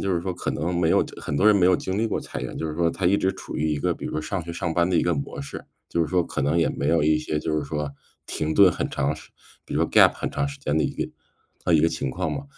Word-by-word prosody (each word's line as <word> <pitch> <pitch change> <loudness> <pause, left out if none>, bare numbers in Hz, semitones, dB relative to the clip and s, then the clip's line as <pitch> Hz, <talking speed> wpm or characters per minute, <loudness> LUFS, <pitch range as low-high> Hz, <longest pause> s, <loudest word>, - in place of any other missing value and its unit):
就 95 -2 0
是 85 - 0
说 90 +1 -3
可 - - -3
能 85 +4 -2
没 85 -2 +2
有 - - +4 0.2
很 75 - -3
多 95 - +3
人 105 - +7
没 90 - +3
有 90 - +5
经 95 +2 -3
历 115 - +2
过 - - -1
裁 - - -6
员。 65 - -5
就 80 - -2
是 75 - -4
说 85 0 +2
他 90 +1 -1
一 100 +3 +4
直 95 -1 +1
处 95 - -8
于 80 +1 0
一 75 - -1
个 - - 0
比 - - -9
如 - - -3
说 75 - -1
上 90 +3 -3
学、 85 - -6
上 85 0 -2
班 85 0 +3
的 95 - 0
一 - - +3
个 85 -1 +2
模 70 -1 -4
式， 70 - -7 0.2
就 85 - -1
是 80 - -1
说 90 +1 +2
可 65 - -3
能 75 +4 +2
也 80 - +3
没 70 - -2
有 85 -1 +3
一 75 +1 +4
些， 75 0 -2
就 75 0 -1
是 75 - -3
说， 75 0 -3 0.4
停 80 0 -2
顿 95 +2 +7
很 - - -2
长 70 +3 0
时 80 - -14 0.3
比 - - -9
如 - - +1
说 - - 0
gap - - +7
很 - - -3
长 140 - 0
时 140 - -8
间 80 - -1
的 80 - +3
一 - - -1
个 - - -2 0.6
呃， 90 - +2
一 75 - +5
个 80 - +4
情 70 -5 -3
况 - - -2
嘛。 140 - -4
80 Hz, 365 characters per minute, -24 LUFS, 75-90 Hz, 0.6 s, 人